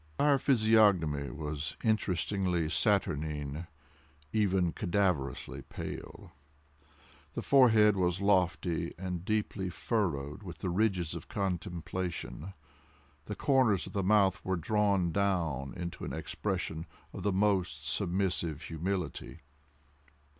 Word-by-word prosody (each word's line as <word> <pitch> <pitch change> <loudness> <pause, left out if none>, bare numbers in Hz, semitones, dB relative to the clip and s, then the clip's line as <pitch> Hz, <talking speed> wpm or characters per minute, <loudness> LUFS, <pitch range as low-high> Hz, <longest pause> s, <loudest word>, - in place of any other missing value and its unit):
His 75 - -30
entire 145 -1 +4
physiognomy 105 - +3
was 75 -1 -5
interestingly 95 -5 +1
saturnine—even 80 +1 -1
cadaverously 90 - -1
pale. - - -8 1.0
The - - -4
forehead 110 -6 +6
was 90 -1 +1
lofty, 90 -4 +1
and 90 -2 -4
deeply 105 -2 -1
furrowed 85 - -2
with 90 -5 -8
the 90 +2 -3
ridges 90 -4 +1
of 85 0 -7
contemplation. 90 -2 -4 0.7
The 105 - -5
corners 125 - +3
of - - -10
the 100 - 0
mouth 100 0 +3
were 95 - 0
drawn 100 0 +1
down 80 -9 0
into 85 -1 -6
an - - -4
expression 90 -5 -3 0.3
of - - -6
the 100 - +1
most 95 -7 +1
submissive 90 -2 0
humility. 85 0 -4
90 Hz, 105 wpm, -31 LUFS, 80-100 Hz, 1.0 s, forehead